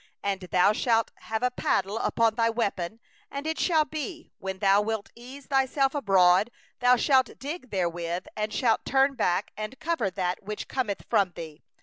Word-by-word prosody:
14And 195 -2 -2
thou 185 +3 +4
shalt 225 0 +1
have 220 +1 -4
a 250 - +2
paddle 205 -3 0
among 230 -1 +2
thy 230 0 +2
weapons; 220 -3 -2 0.3
and 280 +1 -6
it 320 0 -2
shall 320 -4 +3
be, 315 +3 -6
when 190 0 -4
thou 195 +1 +4
sittest 235 +5 -6
down 270 0 +2
abroad, 195 -6 +4 0.3
thou 250 0 +5
shalt 260 0 +2
dig 285 -1 -6
therewith, 175 -2 -2
and 215 0 -2
shalt 225 0 +1
turn 270 +1 +3
back 195 -6 0
and 215 +5 -6
cover 320 -10 0
that 180 -1 -2
which 210 +1 -6
cometh 240 -7 -2
from 190 -3 +2
thee. 160 -2 -9
225 Hz, 165 wpm, -27 LUFS, 195-265 Hz, 0.3 s, thou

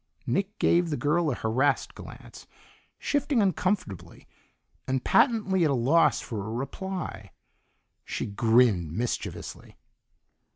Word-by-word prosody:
Nick 200 +2 -1
gave 170 0 +2
the 150 - -2
girl 155 +2 +1
a 130 - -1
harassed 130 +6 0
glance, - - -12 0.5
shifting 285 -3 0
uncomfortably, 185 - -2 0.6
and 130 -1 -1
patently 210 -8 +3
at 155 - +3
a 140 - +2
loss 140 +8 +3
for 110 -5 -5
a 105 - -6
reply. 140 - -5 0.7
She - - -4
grinned 110 -5 +2
mischievously. 120 +6 -5
145 Hz, 115 wpm, -27 LUFS, 115-190 Hz, 0.7 s, patently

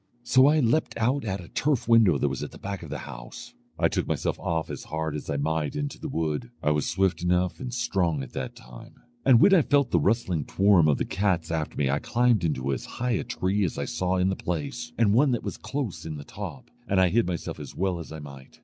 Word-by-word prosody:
So 130 +2 +5
I 155 +2 +4
leapt 120 +4 +1
out 125 +5 +1
at 95 -2 -2
a - - -12
turf 140 -6 0
window 115 -9 +5
that 70 - +1
was 70 -1 -3
at - - -4
the - - -13
back 100 0 -5
of 80 - -9
the 75 - -4
house. - - -9 0.2
I - - +3
took - - -2
myself - - -1
off 80 -1 -2
as - - -7
hard 80 0 -3
as 75 - -6
I 70 - 0
might 75 0 -1
into 145 -1 -3
the 155 - -5
wood. 80 - -2
I 75 - +3
was 75 -1 0
swift 95 -2 +1
enough 90 0 +1
and 130 -2 -5
strong 95 - 0
at 65 - -10
that - - -5
time; - - -13 0.3
and 130 -4 +6
when 195 - +6
I 185 - +7
felt 140 -3 +2
the 85 - +4
rustling 95 -3 +1
toirm 95 -5 +4
of 70 - +3
the - - -1
cats 90 -5 0
after 80 -2 -2
me 70 - +1
I 70 - +1
climbed 120 -4 +2
into 70 -4 0
as 65 - -4
high 125 +1 0
a 115 - 0
tree 100 +3 -1
as 85 - -2
I - - -2
saw 90 0 -1
in 90 +1 +2
the 95 - 0
place, 90 +10 -4
and 105 -3 +4
one 135 +5 +4
that 120 - -2
was - - -5
close 135 -9 -4
in 80 -2 -5
the 70 - -8
top; - - -8 0.2
and 95 - +2
I 95 -1 +5
hid 115 +2 +2
myself 90 -2 -4
as - - -9
well 95 -2 -1
as 80 - -8
I 80 - -6
might. 70 -3 -11
90 Hz, 255 wpm, -26 LUFS, 80-120 Hz, 0.3 s, I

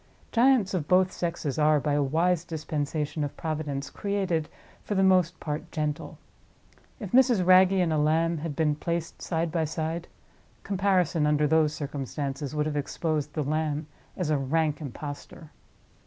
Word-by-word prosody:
Giants 240 -4 +4
of 165 -6 -2
both 185 0 +4
sexes 165 -4 -3
are, 150 0 +4
by 145 +1 -1
a 145 - +2
wise 165 +5 +1
dispensation 150 -2 -3
of 145 - -5
Providence, 150 -3 -3
created, 190 -6 -1 0.3
for 205 - -3
the 190 - +3
most 180 -3 +3
part, 150 0 -5
gentle. 150 +1 -3 0.8
If 205 -6 -6
Mrs. 245 -7 +4
Wragge 185 +1 +6
and 180 -4 +2
a 155 - +1
lamb 160 +2 +2
had 155 -1 -4
been 155 -1 +2
placed 170 +2 -4
side 165 -1 -1
by 165 -1 0
side, 160 +2 -3 0.6
comparison, 185 -5 +1
under 150 0 +2
those 155 0 +3
circumstances, 140 0 -4
would 150 0 +1
have 150 -1 -2
exposed 150 0 -2
the 155 - 0
lamb 155 +1 -1 0.3
as 175 -5 -1
a 150 - +2
rank 150 +2 0
impostor. 145 +2 -8
160 Hz, 155 wpm, -27 LUFS, 150-175 Hz, 0.8 s, Wragge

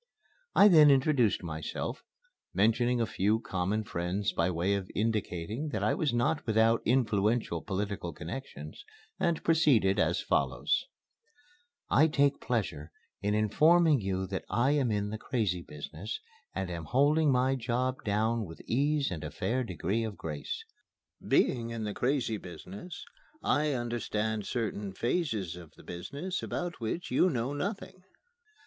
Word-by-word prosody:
I 205 - +8
then 155 -6 +8
introduced 135 -7 +3
myself, 80 -2 -4 0.5
mentioning 120 +4 +3
a 115 - +2
few 105 +2 +1
common 95 +1 -1
friends, 90 +2 -2
by 85 +2 +1
way 90 +3 0
of 100 -2 -2
indicating 105 - -1
that 105 -7 -2
I 110 - +3
was 150 - 0
not 120 +5 0
without 110 +1 +3
influential 110 -6 +1
political 100 -2 -3
connections, 85 - -8 0.4
and 170 -2 0
proceeded 130 -12 +4
as - - +2
follows: - - 0 1.0
"I 155 +3 +5
take 140 -2 +2
pleasure 95 - -2 0.3
in 105 +1 +1
informing 150 - +4
you 95 -1 -1
that 95 0 -4
I 120 +4 +2
am 140 -4 +2
in 105 -1 -1
the 110 - -4
Crazy 105 -10 -1
Business 80 +7 -7 0.4
and 95 -2 -2
am 85 -2 -5
holding 145 - +3
my 130 +1 +3
job 130 +1 -1
down 110 +2 +1
with 80 -4 -9
ease 140 +2 +1
and 80 -4 -5
a 75 - -4
fair 130 - -1
degree 95 +2 -2
of 110 -3 -5
grace. 75 -3 -5 0.6
Being 115 -2 +2
in 115 -1 -4
the 105 -1 -3
Crazy 125 -3 0
Business, 100 - -9 0.4
I 150 0 +2
understand 110 -3 -2
certain 105 -4 -3
phases 110 - -1
of 85 -3 -12
the - - -16
business 140 - -5
about 175 0 -4
which 145 +10 -3
you 185 - +4
know 130 -2 -1
nothing. 185 +4 -4
110 Hz, 145 wpm, -30 LUFS, 95-135 Hz, 1.0 s, I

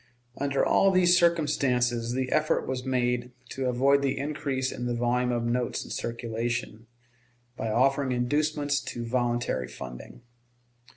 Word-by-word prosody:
Under 140 -1 0
all 195 - +4
these 180 -2 +5
circumstances 135 -9 +2
the 130 0 -2
effort 155 0 +1
was 130 -1 -3
made 125 -1 -1 0.2
to 135 -1 -3
avoid 135 +3 +3
the 140 -1 0
increase 135 -2 -2
in 120 - -4
the 120 - -1
volume 125 +1 +1
of 120 -1 -1
notes 120 +1 -1
in - - -10
circulation, 115 0 -3 0.7
by 115 - -3
offering 135 +4 +2
inducements 145 +3 0
to 120 -1 -5
voluntary 120 - -1
funding. 65 - -10
125 Hz, 135 wpm, -27 LUFS, 120-140 Hz, 0.7 s, these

